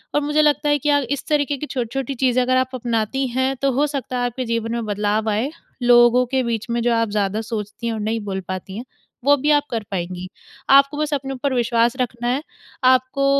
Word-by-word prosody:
और 295 Hz, -, +3 dB
मुझे 295 Hz, +1 st, +2 dB
लगता 295 Hz, -1 st, +2 dB
है 290 Hz, 0 st, +3 dB
कि 295 Hz, -, -1 dB
आप 285 Hz, -1 st, +3 dB
इस 285 Hz, -, -3 dB
तरीक़े 290 Hz, -2 st, +1 dB
की 300 Hz, -, -5 dB
छोटी-छोटी 270 Hz, 0 st, -3 dB
चीज़ें 255 Hz, 0 st, +2 dB
अगर 255 Hz, +1 st, +2 dB
आप 260 Hz, 0 st, 0 dB
अपनाती 235 Hz, +2 st, -1 dB
हैं, 260 Hz, +2 st, 0 dB
तो 275 Hz, 0 st, +2 dB
हो 285 Hz, +4 st, +1 dB
सकता 270 Hz, -3 st, -4 dB
है 245 Hz, -, 0 dB
आपके 245 Hz, +1 st, -3 dB
जीवन 230 Hz, -1 st, -2 dB
में 235 Hz, -1 st, -2 dB
बदलाव 210 Hz, +1 st, 0 dB
आए। 220 Hz, +7 st, 0 dB, 0.3 s
लोगों 240 Hz, +1 st, +6 dB
के 260 Hz, +2 st, 0 dB
बीच 230 Hz, -1 st, -3 dB
में 235 Hz, 0 st, 0 dB
जो 240 Hz, 0 st, +2 dB
आप 230 Hz, -1 st, +1 dB
ज़्यादा 205 Hz, 0 st, -1 dB
सोचती 220 Hz, +1 st, -5 dB
हैं 230 Hz, -, -1 dB
और 220 Hz, -, -4 dB
नहीं 220 Hz, +2 st, -1 dB
बोल 190 Hz, -1 st, -3 dB
पाती 185 Hz, +1 st, -6 dB
हैं 240 Hz, -, -6 dB, 0.4 s
वो 285 Hz, 0 st, +6 dB
भी 295 Hz, +3 st, +1 dB
आप 290 Hz, -1 st, +4 dB
कर 225 Hz, -2 st, -2 dB
पाएँगी। 180 Hz, -1 st, -4 dB, 0.4 s
आपको 275 Hz, +2 st, +5 dB
बस 300 Hz, 0 st, -1 dB
अपने 270 Hz, -1 st, -2 dB
ऊपर 270 Hz, +1 st, -2 dB
विश्वास 235 Hz, 0 st, +2 dB
रखना 240 Hz, -1 st, -3 dB
है, 255 Hz, +3 st, 0 dB, 0.4 s
आपको 255 Hz, +2 st, +3 dB
245 Hz, 230 wpm, -21 LUFS, 225-275 Hz, 0.4 s, लोगों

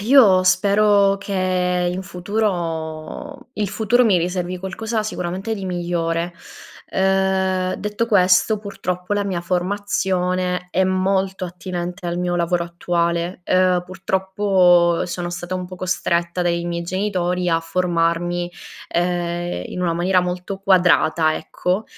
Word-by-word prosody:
io 210 Hz, -5 st, +6 dB
spero 200 Hz, +1 st, +4 dB
che 185 Hz, -2 st, 0 dB
in 185 Hz, +1 st, -4 dB
futuro 180 Hz, -, -3 dB
il 210 Hz, -2 st, -1 dB
futuro 225 Hz, +4 st, +2 dB
mi 195 Hz, -6 st, +4 dB
riservi 180 Hz, +1 st, -2 dB
qualcosa 215 Hz, +4 st, -3 dB
sicuramente 190 Hz, +1 st, -3 dB
di 195 Hz, -3 st, -6 dB
migliore. 170 Hz, -1 st, -1 dB, 0.6 s
Ehm, 190 Hz, -1 st, +1 dB
detto 210 Hz, +2 st, -2 dB
questo, 190 Hz, 0 st, +4 dB
purtroppo 185 Hz, -2 st, -4 dB
la 205 Hz, -, +1 dB
mia 190 Hz, -3 st, -2 dB
formazione 180 Hz, -1 st, -1 dB
è 190 Hz, -, +2 dB
molto 190 Hz, 0 st, 0 dB
attinente 180 Hz, 0 st, -5 dB
al 170 Hz, +1 st, -2 dB
mio 180 Hz, 0 st, -1 dB
lavoro 170 Hz, 0 st, 0 dB
attuale. 170 Hz, +1 st, -1 dB
Ehm, 185 Hz, -1 st, +3 dB
purtroppo 185 Hz, -2 st, +2 dB
sono 175 Hz, 0 st, -4 dB
stata 175 Hz, +1 st, -5 dB
un 185 Hz, 0 st, -3 dB
po' 185 Hz, 0 st, -9 dB
costretta 175 Hz, -1 st, -1 dB
dai 170 Hz, -1 st, 0 dB
miei 170 Hz, 0 st, -3 dB
genitori 180 Hz, -1 st, -1 dB
a 165 Hz, 0 st, +2 dB
formarmi, 175 Hz, 0 st, 0 dB, 0.4 s
ehm, 175 Hz, 0 st, -1 dB
in 180 Hz, -, -6 dB
una 170 Hz, -2 st, +1 dB
maniera 180 Hz, +2 st, +2 dB
molto 180 Hz, +2 st, -4 dB
quadrata, 175 Hz, -4 st, +3 dB
ecco. 185 Hz, +4 st, -2 dB
180 Hz, 125 wpm, -21 LUFS, 175-190 Hz, 0.6 s, io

